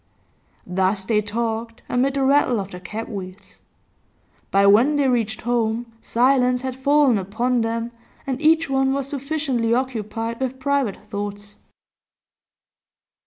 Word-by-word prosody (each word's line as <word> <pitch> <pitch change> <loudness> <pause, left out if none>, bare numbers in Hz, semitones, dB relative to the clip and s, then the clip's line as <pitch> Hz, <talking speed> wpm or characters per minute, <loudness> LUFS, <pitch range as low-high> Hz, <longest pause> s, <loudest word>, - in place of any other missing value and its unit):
Thus 190 +2 0
they 210 0 +2
talked, 225 +2 -3
amid 265 +2 +1
the 275 - +1
rattle 265 -4 +3
of 195 0 -5
the 180 - -8
cab 215 +5 -6
wheels. 195 -2 -9 0.9
By 195 0 +3
when 230 +9 +5
they 285 -2 +2
reached 225 -4 0
home 230 0 -1
silence 250 0 +2
had 260 -1 -3
fallen 275 -3 +3
upon 235 +6 0
them, 230 +1 -2 0.3
and 265 0 -3
each 320 +1 +4
one 270 0 +1
was 275 -1 -2
sufficiently 275 -5 -1
occupied 230 -2 -3
with 260 0 -3
private 275 -6 0
thoughts. 205 0 -6
235 Hz, 130 wpm, -22 LUFS, 210-265 Hz, 0.9 s, when